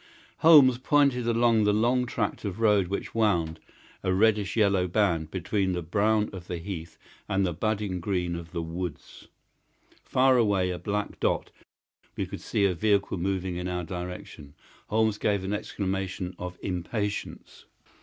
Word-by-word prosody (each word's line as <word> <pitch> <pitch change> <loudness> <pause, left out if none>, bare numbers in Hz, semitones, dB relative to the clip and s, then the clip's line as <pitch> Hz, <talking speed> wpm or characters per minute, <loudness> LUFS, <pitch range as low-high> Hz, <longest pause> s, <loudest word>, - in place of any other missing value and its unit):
Holmes 140 -6 +7
pointed 135 -3 +2
down 115 -1 +3
the 105 0 +3
long 120 +4 +2
tract 105 -3 -2
of 100 -1 -4
road 105 -4 +3
which 100 +2 -4
wound, 85 -8 +1 0.4
a 95 - 0
reddish 105 +1 +2
yellow 100 -4 +3
band, 85 -5 +1
between 95 +2 -1
the 90 -1 -3
brown 105 +5 +1
of 90 -2 -9
the 90 - -3
heath 85 -2 -7 0.3
and 95 0 +1
the 90 - -1
budding 105 0 -2
green 90 -1 -1
of 85 -1 -8
the 85 -1 -3
woods. 85 0 -7 0.8
Far 130 0 +3
away, 100 -5 +2
a 90 - -4
black 105 -1 -3
dot, - - 0 0.6
we - - -2
could - - -8
see 100 - 0
a 95 - +2
vehicle 100 +1 +1
moving 95 -1 -2
in 90 0 -3
our 90 -1 -2
direction. 90 -5 -7 0.3
Holmes 110 -1 +1
gave 100 -3 0
an 95 +2 -2
exclamation 95 -3 -3
of 90 0 -6
impatience. 100 +3 -4
100 Hz, 155 wpm, -27 LUFS, 90-110 Hz, 0.8 s, Holmes